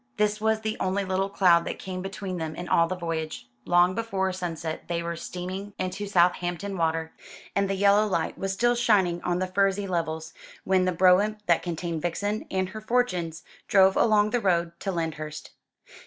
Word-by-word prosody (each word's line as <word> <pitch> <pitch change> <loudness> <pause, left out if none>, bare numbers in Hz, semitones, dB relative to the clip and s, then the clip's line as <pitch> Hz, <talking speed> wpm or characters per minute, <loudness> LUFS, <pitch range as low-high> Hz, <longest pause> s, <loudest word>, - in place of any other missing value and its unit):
This 210 0 +1
was 220 0 +1
the 220 0 -3
only 190 +1 0
little 190 +1 0
cloud 180 -4 +4
that - - -4
came 185 -1 -6
between 195 -1 -5
them 160 -1 -4
in 175 +2 -6
all 170 -1 +3
the 185 - -3
voyage. 160 -6 -4 0.2
Long 175 +1 +4
before 195 -3 -1
sunset 165 -3 -4
they 170 -1 -2
were 170 0 -3
steaming 185 +4 -6
into 185 +2 -3
Southampton 180 +1 +1
Water, 160 -1 -1 0.4
and 200 -1 +1
the 195 - 0
yellow 200 +2 +4
light 170 -5 -1
was 195 0 -3
still 240 +5 +2
shining 200 -8 +2
on 175 0 0
the 185 - 0
furzy 195 +1 +1
levels, 160 -3 -3 0.3
when 185 -1 +2
the 185 - +2
brougham 185 +4 +4
that 170 -2 +3
contained 170 -1 -4
Vixen 205 +6 -2
and 185 -1 -1
her 215 +3 -8
fortunes 185 -9 -1 0.2
drove 190 -2 +5
along 215 -2 +3
the 245 - +1
road 170 -4 +1
to 195 - -2
Lyndhurst. 155 -3 -4
185 Hz, 185 wpm, -26 LUFS, 170-200 Hz, 0.4 s, drove